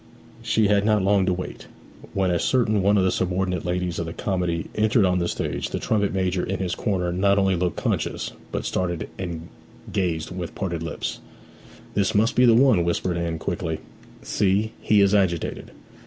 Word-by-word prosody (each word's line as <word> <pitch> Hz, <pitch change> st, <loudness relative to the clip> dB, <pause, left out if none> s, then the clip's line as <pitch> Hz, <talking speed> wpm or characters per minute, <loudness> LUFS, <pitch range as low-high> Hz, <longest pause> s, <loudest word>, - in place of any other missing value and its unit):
She 110 Hz, -2 st, +2 dB
had 100 Hz, 0 st, +3 dB
not 105 Hz, -2 st, +2 dB
long 100 Hz, -1 st, +3 dB
to 90 Hz, -, +3 dB
wait. 90 Hz, +1 st, -6 dB, 0.5 s
When 95 Hz, -2 st, +2 dB
a 85 Hz, -, +1 dB
certain 110 Hz, -3 st, +2 dB
one 100 Hz, +2 st, +3 dB
of 95 Hz, -, +3 dB
the 95 Hz, -, +2 dB
subordinate 90 Hz, -1 st, -1 dB
ladies 90 Hz, -1 st, -1 dB
of 85 Hz, -, -3 dB
the 80 Hz, -, -5 dB
comedy 90 Hz, -4 st, -1 dB
entered 105 Hz, 0 st, +3 dB
on 90 Hz, 0 st, +2 dB
the 85 Hz, -, 0 dB
stage -, -, -3 dB
the -, -, -3 dB
trumpet 100 Hz, -2 st, 0 dB
major 95 Hz, -1 st, 0 dB
in 95 Hz, -, -2 dB
his 95 Hz, -2 st, -2 dB
corner 90 Hz, -5 st, -1 dB
not 100 Hz, +2 st, +3 dB
only 95 Hz, -1 st, +3 dB
looked 90 Hz, -1 st, -1 dB
conscious, -, -, -2 dB, 0.2 s
but -, -, -3 dB
started 85 Hz, -2 st, -2 dB
and 85 Hz, -3 st, -5 dB, 0.5 s
gazed 85 Hz, -4 st, -1 dB
with 90 Hz, -2 st, -5 dB
parted 85 Hz, -4 st, -3 dB
lips. 80 Hz, -, -4 dB, 0.7 s
'This 100 Hz, -1 st, +1 dB
must 110 Hz, +4 st, +3 dB
be 125 Hz, -, +5 dB
the 115 Hz, -2 st, +6 dB
one,' 120 Hz, -8 st, +5 dB
whispered 85 Hz, +1 st, 0 dB
Anne 85 Hz, -1 st, -2 dB
quickly. 80 Hz, 0 st, -3 dB, 0.5 s
'See, 105 Hz, +2 st, +1 dB
he 105 Hz, -1 st, +4 dB
is 100 Hz, 0 st, +4 dB
agitated!' 95 Hz, -5 st, 0 dB
95 Hz, 185 wpm, -24 LUFS, 90-100 Hz, 0.7 s, the